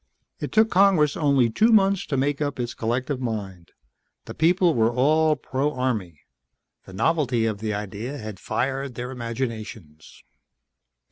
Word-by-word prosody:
It - - -5
took 220 0 +3
Congress 180 -6 +4
only 140 -5 +3
two 215 - +3
months 195 -3 +3
to 140 - -1
make 140 +2 0
up 145 -3 -2
its 120 -1 -3
collective 125 +4 -2
mind. 100 -7 -5 0.6
The - - -8
people 175 +1 +3
were 115 -3 +2
all 155 +5 +3
pro 140 +2 -2
Army. 110 - -3 0.6
The 95 - -12
novelty 125 - +1
of 110 -2 -2
the 110 -1 -2
idea 105 +7 -5
had 110 -6 -8
fired 135 0 -3
their 125 +2 -5
imaginations. 115 - -6
125 Hz, 145 wpm, -24 LUFS, 110-150 Hz, 0.6 s, Congress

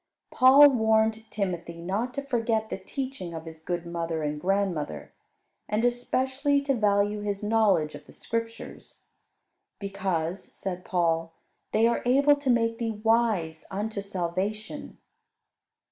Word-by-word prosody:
Paul 275 +3 +8
warned 220 -2 +2
Timothy 175 -4 -3
not 200 +9 -2
to 280 - -3
forget 230 -4 -1
the - - -3
teaching 255 - -5
of 160 0 -7
his 160 -1 -9
good 175 +1 -3
mother 165 -2 -3
and 150 0 -3
grandmother; 180 - -1 0.6
and 215 +3 +1
especially 260 +4 +1
to 275 -1 +1
value 205 -2 +1
his 205 0 -3
knowledge 210 -8 +2
of 145 - -11
the - - -15
Scriptures. 230 0 -6 0.7
Because, 190 -3 -2
said 180 -2 -6
Paul, 165 -3 0 0.4
"they 225 - +3
are 235 - +2
able 275 +4 +5
to 285 -2 -3
make 230 -1 +2
thee 225 -3 -3
wise 215 -9 +1
unto 205 +1 -3
salvation." 200 - -3
210 Hz, 130 wpm, -27 LUFS, 175-235 Hz, 0.7 s, Paul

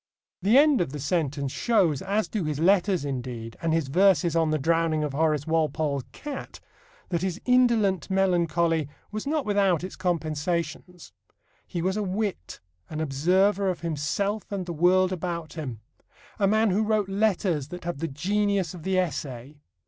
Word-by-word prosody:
The 210 +7 +4
end 290 -6 +5
of 150 -5 -2
the 150 - -5
sentence 145 -2 -1
shows 175 - +2
(as 205 +3 0
do 210 -5 -2
his 150 -2 -2
letters, 185 -1 +3
indeed, 125 -4 -5
and 165 - 0
his 160 -3 +1
verses 175 +2 +3
on 165 -1 +2
the 155 - +1
drowning 160 +1 +1
of 150 -2 -3
Horace 150 -1 +1
Walpole's 155 -4 0
cat) 290 -2 -7 0.5
that 170 -2 -1
his 185 0 -2
indolent 230 - +3
melancholy 170 -5 +1 0.2
was 215 +4 -5
not 300 -1 0
without 195 -5 +2
its 185 - -6
compensations. 170 0 -3 0.5
He 170 -3 -3
was 190 +2 0
a - - 0
wit, 195 - -3 0.3
an 155 - -5
observer 185 +7 +2
of 180 - -3
himself 170 +7 -2
and 195 -2 -3
the 170 - -4
world 180 +3 +3
about 170 -3 -4
him, 130 -9 -6 0.6
a 200 - +3
man 215 +1 +3
who 200 +4 +2
wrote 215 -2 +1
letters 195 -7 0
that 180 +3 -8
have 170 -4 -4
the 165 - -2
genius 195 +4 0
of 175 - -9
the 190 +3 0
essay. 145 -5 -3
175 Hz, 165 wpm, -26 LUFS, 155-195 Hz, 0.6 s, end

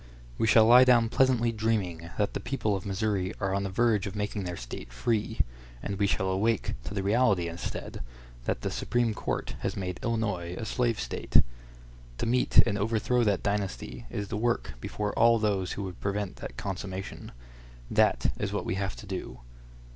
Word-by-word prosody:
We 110 - +2
shall 110 0 +7
lie 120 +3 +9
down 120 -3 +5
pleasantly 120 -2 +3
dreaming 105 -7 -1
that 105 -1 0
the - - -2
people 110 -6 -1
of 95 - -5
Missouri 100 -1 -1
are 100 -1 0
on 100 - +1
the 100 - -2
verge 110 0 +2
of 100 - -6
making 105 -1 -2
their 90 -1 -4
State - - -8
free, 105 - 0 0.4
and 100 -1 -3
we 100 - +3
shall 95 -1 0
awake 105 +3 +1
to 100 - -5
the 100 - -1
reality, 100 -4 +3
instead, 85 +1 -5 0.4
that - - -1
the - - -2
Supreme 120 -2 0
Court - - -3
has - - -3
made 90 -2 -3
Illinois 100 -7 -1
a 110 - -4
slave 115 0 0
State. - - +3 0.7
To - - -2
meet 125 +2 +1
and 100 +1 -1
overthrow 115 +3 +1
that 100 -3 +1
dynasty 65 -12 -3
is 100 +4 -4
the 105 - -2
work 120 - 0
before 105 -1 -3
all 115 0 +5
those 100 -4 0
who 100 - -4
would 95 -2 -7
prevent 100 -1 -2
that - - -8
consummation. 95 0 -5 0.6
That - - +3
is - - -1
what - - -2
we - - -1
have 95 -2 -2
to - - -10
do. 90 -10 -6
100 Hz, 185 wpm, -28 LUFS, 95-115 Hz, 0.7 s, lie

